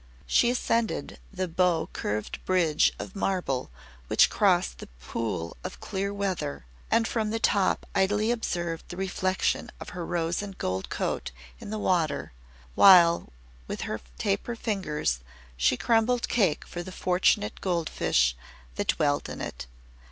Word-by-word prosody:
She 240 - +4
ascended 235 -2 -1
the 185 -2 -2
bow 175 -1 +1
curved 105 +1 -3
bridge 170 -5 +3
of - - -7
marble 180 -10 -1 0.4
which - - +5
crossed 60 0 +2
the - - -8
Pool 85 - -3
of - - -6
Clear 195 +1 -3
Weather, 185 - -3 0.2
and 225 -1 +3
from 220 -2 -1
the 225 - -1
top 200 -4 +2
idly 210 +4 +2
observed 175 -8 -3
the 175 - -7
reflection 190 0 0
of - - -8
her 175 -1 -5
rose 170 0 -1
and 195 -2 -7
gold 95 +1 -2
coat - - -2 0.3
in - - -9
the 215 - -3
water 170 - 0 0.4
while, 170 - +7 0.4
with - - -4
her - - -3 0.2
taper 235 - -1
fingers, 185 - -1 0.4
she 65 - +2
crumbled 235 - +2
cake 190 -10 +1
for 175 - -6
the 185 +2 -8
fortunate 180 - +1
gold 170 -4 0
fish - - +2 0.4
that - - -1
dwelt 145 -1 +1
in - - -6
it. 65 - -6
180 Hz, 145 wpm, -27 LUFS, 150-200 Hz, 0.4 s, while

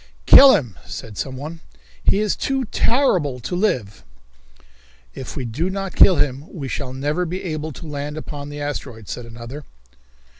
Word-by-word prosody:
"Kill 270 -1 +10
him," 120 - -3
said 110 -2 -7
someone. 145 +7 -5 0.4
"He 200 - +3
is 210 -2 +1
too 270 -1 -1
horrible 180 - +2
to 175 - -3
live." 125 - -1 1.1
"If 130 - -7
we 130 - -3
do 145 +11 -2
not 195 0 -4
kill 185 - +7
him 140 -1 0
we 145 -6 -6
shall 130 0 -4
never 145 +6 -1
be 180 +2 -4
able 155 -3 -3
to 165 - -10
land 150 0 -5
upon 145 -2 -6
the 145 0 -7
asteroid," 130 -7 -5
said 120 -1 -6
another. 115 +5 -8
145 Hz, 160 wpm, -21 LUFS, 130-180 Hz, 1.1 s, Kill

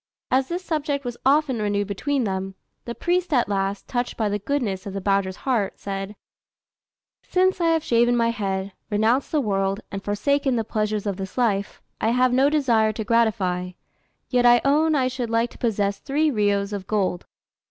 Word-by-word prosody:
As 260 +1 +2
this 355 +2 -4
subject 290 -4 -2
was 245 -1 -4
often 275 -4 +3
renewed 205 -1 0
between 260 +7 -1
them, 190 -2 -3 0.3
the 235 - -5
priest 355 0 0
at 250 -5 +3
last, 195 0 -2
touched 245 -1 -2
by 215 -2 0
the 205 +1 -1
goodness 205 -5 -2
of 195 - -6
the - - -1
badger's 195 -1 0
heart, 230 -7 0
said, 195 +1 -5 1.1
"Since 370 0 +1
I 335 - +3
have 325 -1 +2
shaven 240 +1 +3
my 230 0 +2
head, 195 -3 -3 0.2
renounced 225 +5 +1
the 310 - +2
world, 195 -4 0
and 195 0 -5
forsaken 265 +6 +1
the 225 - 0
pleasures 215 -1 -2
of 200 -3 -2
this 190 +2 -7
life, 205 -5 0 0.2
I - - +2
have 250 0 +3
no 270 +3 +4
desire 240 -8 +2
to 220 +1 -4
gratify, 200 -6 +1 0.5
yet 250 -1 +2
I 240 0 +7
own 305 +3 +3
I 260 -3 +2
should 250 -2 -3
like 230 +1 +1
to - - -16
possess 205 -4 0
three 300 +2 +1
riyos 205 -3 0
in 200 - -3
gold. 190 -4 -1
225 Hz, 185 wpm, -23 LUFS, 200-270 Hz, 1.1 s, I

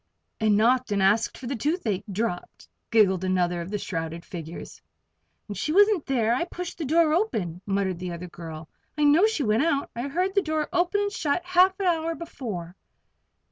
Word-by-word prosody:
"And 215 -2 +3
knocked, 245 +2 +3
and 200 - +1
asked 205 +3 +2
for 260 - -9
toothache 245 - -1
drops," 190 -3 -4 0.2
giggled 195 -5 +3
another 180 -2 0
of 170 - -6
the 210 - -2
shrouded 165 -3 -5
figures. 170 -3 -8 0.7
"And 205 - -6
she 255 +11 -2
wasn't 405 -1 +4
there. 235 -4 +2
I 260 +8 0
pushed 360 0 -7
the 320 - -2
door 315 +2 +3
open," 205 - -1
muttered 195 -3 -1
the 180 -1 -4
other 170 +1 -6
girl. 165 -2 -9 0.3
"I 300 - +1
know 305 +8 +6
she 440 -10 -1
went 215 0 +2
out. 285 -4 0
I 240 +4 -3
heard 365 +7 -1
the 400 - +3
door 310 -3 -1
open 360 +3 +2
and 405 0 -1
shut 345 -2 -1
half 370 +2 +4
an 390 - -1
hour 330 -2 +1
before." 215 - -6
240 Hz, 185 wpm, -26 LUFS, -, 0.7 s, know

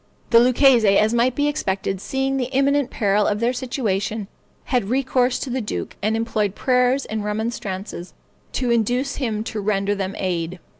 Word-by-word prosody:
The 230 - +8
Lucchese, 240 -4 +5
as 215 +2 +3
might 240 +1 +2
be 290 +2 +1
expected, 195 -9 -2
seeing 270 +2 -1
the 255 -1 -2
imminent 280 0 +2
peril 205 -1 +1
of 210 - 0
their 235 +2 +1
situation, 220 -5 -2 0.4
had 245 -6 -1
recourse 255 -1 +1
to 265 - -5
the 260 +1 -1
duke, 210 - -5
and 215 +2 +1
employed 215 -3 -1
prayers 255 +1 +2
and 220 -1 -4
remonstrances 210 -4 -4 0.4
to 250 -2 0
induce 245 +4 0
him 220 -6 -2
to 220 -1 -4
render 200 0 0
them 195 -1 -3
aid. 175 -1 -2
230 Hz, 165 wpm, -22 LUFS, 205-255 Hz, 0.4 s, The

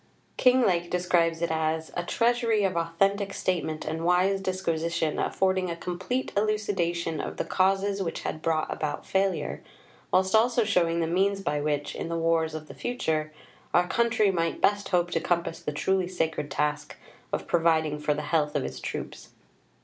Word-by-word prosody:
Kinglake 200 -10 +3
describes 170 -2 +1
it 170 - 0
as 160 0 -1
"a 175 - 0
treasury 230 +1 +1
of 190 -2 +1
authentic 195 +4 0
statement 160 -4 -2
and 160 +1 -3
wise 185 +3 +3
disquisition, 170 -4 -1
affording 190 -1 +1
a 170 - -2
complete 185 +10 -3
elucidation 190 -6 0
of - - -6
the - - -2
causes 195 +1 +1
which 170 - -3
had 155 - -4
brought 160 -1 0
about 150 -1 -4
failure, 190 0 0 0.5
whilst 190 0 +2
also 235 +2 +4
showing 170 -5 +2
the - - +1
means 195 +4 +1
by 150 -6 -1
which, 145 -1 -1
in - - -5
the 170 - -1
wars 165 -1 +1
of 155 -1 -7
the - - -10
future, 160 -11 -2 0.4
our 180 0 +4
country 225 -1 +2
might 165 -2 -1
best 205 0 +2
hope 175 -2 +1
to 165 - +1
compass 170 0 -1
the - - -4
truly 185 +5 0
sacred 160 -5 -2
task 150 0 -2 0.3
of - - -2
providing 160 -3 +2
for 150 0 0
the 150 - -4
health 150 0 0
of - - 0
its - - -6
troops." - - -6
175 Hz, 170 wpm, -27 LUFS, 160-195 Hz, 0.5 s, also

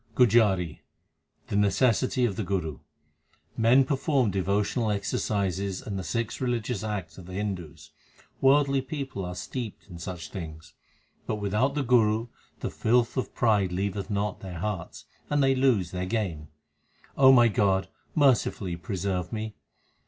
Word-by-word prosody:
GUJARI 105 -9 +3 0.7
The - - -2
necessity 120 +5 +2
of 105 -5 -1
the - - -2
Guru: 90 -6 -2 0.8
Men 120 +4 +5
perform 135 -4 +1
devotional 100 +4 0
exercises 100 -2 -1
l - - -14
and 100 -2 -3
the - - -4
six 115 +7 -3
religious 120 -4 -1
acts 95 -6 -4
of 90 - -11
the 90 - -9
Hindus; 90 -7 -5 0.5
worldly 140 0 +4
people 135 -6 -5
are 90 0 -5
steeped 115 +4 -6
in 85 - -9
such 85 0 -6
things; 80 -4 -8 0.5
But 110 - 0
without 105 +7 0
the 145 - 0
Guru 115 -2 +3 0.3
the - - -3
filth 120 +1 +2
of 130 - -3
pride 105 -5 +2
leaveth 100 +2 -2
not 105 -1 -1
their 90 -3 -7
hearts, 95 -1 -4 0.2
and 145 -1 +2
they 135 0 +4
lose 125 -10 +2
their 90 0 -3
game. 90 -9 -2 0.7
my 130 -3 +7
God, 95 -3 +2 0.3
mercifully 120 - +2
preserve 90 -2 -3
me. 110 -1 -4
105 Hz, 145 wpm, -27 LUFS, 95-120 Hz, 0.8 s, my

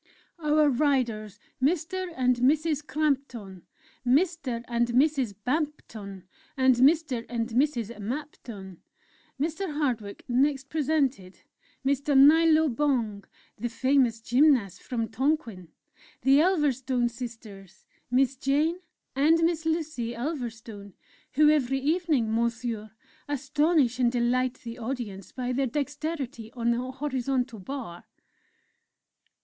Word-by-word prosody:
"Our 305 -1 +3
Riders, 240 -7 0 0.2
Mr. 355 +5 0
and 250 -1 +2
Mrs. 295 +3 +1
Crampton, 260 - -2 0.4
Mr. 270 -3 +1
and 235 0 +1
Mrs. 260 -3 +2
Bampton, 245 - -3 0.3
and 260 0 +5
Mr. 275 -2 +3
and 230 -1 -2
Mrs. 240 -2 0
Mapton." 215 - -7 0.6
Mr. 325 +5 -2
Hardwick 245 -9 -3
next 270 +2 +1
presented: 280 -11 -1 0.4
"Mr. 280 +1 +2
Nilo 315 +3 +6
Bong, 235 -7 -1 0.3
the 240 +2 -2
famous 255 -2 +2
Gymnast 245 - +3
from 230 -3 -3
Tonquin 230 - -1 0.6
the 270 +3 +5
Ulverstone 265 -8 +1
Sisters, 225 -6 -9 0.2
Miss 260 +2 +2
Jane 295 +6 +1 0.4
and 320 +4 +4
Miss 325 -1 0
Lucy 310 -8 -2
Ulverstone, 230 - -6 0.4
who 300 +1 +5
every 270 -3 +1
evening, 295 -6 +1
Monsieur, 230 -1 -2 0.4
astonish 290 -2 +1
and 240 -2 +3
delight 250 +1 +1
the 235 0 -7
audience 225 -5 -5
by 250 -1 -3
their 270 +1 0
dexterity 285 -3 -4
on 235 -1 0
the 235 - 0
Horizontal 260 -4 -2
Bar. 195 -5 -7
260 Hz, 105 wpm, -27 LUFS, 235-295 Hz, 0.6 s, Nilo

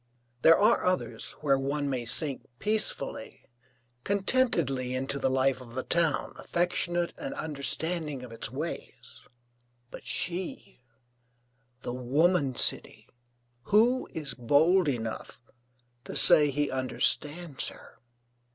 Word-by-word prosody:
There 165 - +7
are 205 - +3
others 185 0 -2
where 140 -3 +2
one 140 +2 -2
may 130 -3 -2
sink 135 +3 +2
peacefully, 215 - -2 0.6
contentedly 175 - 0
into 135 +2 -3
the 135 - +1
life 130 0 +1
of 120 -1 -12
the 130 - -2
town, 165 -3 0
affectionate 175 0 -1
and - - -5
understanding 155 -1 -2
of 125 - -10
its 115 - -4
ways. 150 +6 -7 0.7
But - - -10
she, 175 -6 -4 1.0
the 120 - -4
woman 140 +3 +1
city, - - +1 0.6
who 240 +5 +2
is 150 -5 -5
bold 155 +8 +3
enough 115 -4 -4 0.7
to - - -7
say 150 -1 +6
he 145 +1 -1
understands 145 +3 0
her? - - -11
145 Hz, 115 wpm, -28 LUFS, 130-175 Hz, 1.0 s, There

